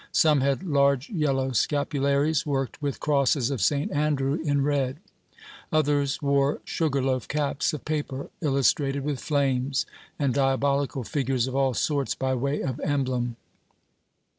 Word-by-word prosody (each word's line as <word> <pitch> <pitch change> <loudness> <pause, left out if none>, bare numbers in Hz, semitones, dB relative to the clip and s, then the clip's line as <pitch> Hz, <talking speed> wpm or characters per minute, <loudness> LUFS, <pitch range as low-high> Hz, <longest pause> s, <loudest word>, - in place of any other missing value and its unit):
Some 150 -4 +4
had 140 +5 0
large 140 - +2
yellow 135 -7 0
scapularies, 140 +2 +1
worked 135 -2 -2
with 140 -2 -2
crosses 140 -3 +2
of 130 -6 -2
St 140 +10 +1
Andrew, 145 -2 +1
in 145 -2 +1
red; 140 -2 0 0.7
others 145 -2 +1
wore 140 0 +2
sugar 140 -5 0
loaf 130 -3 -1
caps 145 -1 0
of 150 - -7
paper, 145 -3 -3
illustrated 140 -1 +1
with 145 -2 -2
flames, 135 -1 0 0.3
and 140 -4 +1
diabolical 140 0 +1
figures 130 -2 0
of 130 0 -5
all 135 -2 +2
sorts 140 +3 0
by 130 0 -1
way 140 +3 -1
of 130 0 -3
emblem. 130 -5 -1
140 Hz, 140 wpm, -26 LUFS, 135-145 Hz, 0.7 s, Some